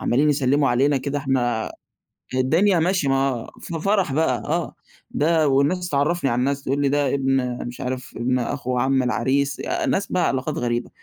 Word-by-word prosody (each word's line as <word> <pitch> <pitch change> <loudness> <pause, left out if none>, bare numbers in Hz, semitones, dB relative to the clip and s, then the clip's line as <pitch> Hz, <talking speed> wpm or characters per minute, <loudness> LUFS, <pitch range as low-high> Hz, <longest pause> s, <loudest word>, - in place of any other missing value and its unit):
عمالين 140 +5 +2
يسلّموا 140 0 +2
علينا 135 +4 +2
كده 140 +2 -2
إحنا 125 -5 -1 0.6
الدنيا 165 +9 +3
ماشية 175 -3 +1
ما 135 -3 0
في 165 -1 -5
فرح 195 -5 +1
بقى 145 -4 +1
آه. - - -2 0.4
ده 160 0 +2
والناس 145 +7 +1
تعرّفني 145 +2 +1
على 120 - 0
الناس 140 +2 -1
تقول 140 +2 -1
لي 140 - +2
ده 145 -1 +1
ابن 135 -2 0
مش 120 - -8
عارف 130 -1 -5
ابن 125 +2 0
أخو 125 0 -2
عم 130 +1 +2
العريس، 135 +2 0 0.3
ناس 200 - 0
بقى 180 -2 +2
علاقات 135 +3 -2
غريبة. 120 0 -2
135 Hz, 170 wpm, -22 LUFS, 130-150 Hz, 0.6 s, الدنيا